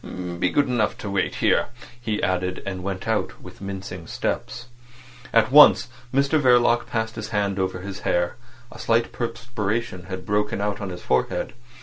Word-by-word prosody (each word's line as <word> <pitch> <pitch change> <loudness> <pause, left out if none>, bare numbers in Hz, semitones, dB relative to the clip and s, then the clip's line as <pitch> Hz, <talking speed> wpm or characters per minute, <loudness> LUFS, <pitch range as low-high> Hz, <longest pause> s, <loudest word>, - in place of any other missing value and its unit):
Be 90 - +2
good 145 +9 +2
enough 120 -4 0
to 100 - -5
wait 100 -1 0
here," - - +2 0.3
he 110 -3 -2
added, 90 -1 -1
and 95 -2 -4
went 95 +1 -4
out 110 -1 -1
with - - -13
mincing 95 -3 -6
steps. 120 - -3 0.7
At 115 +1 +3
once 140 -4 +8 0.2
Mr 140 +3 +2
Verloc 120 -2 +4
passed 110 -1 -2
his 110 -1 -5
hand 100 -2 0
over 95 -1 -1
his 100 0 -6
hair. 85 0 0 0.4
A - - -12
slight 115 0 +1
perspiration 115 -5 -3
had 95 -1 -6
broken 105 0 0
out 105 0 -2
on 100 - -4
his 90 -1 -8
forehead. 65 0 0
105 Hz, 165 wpm, -24 LUFS, 95-115 Hz, 0.7 s, once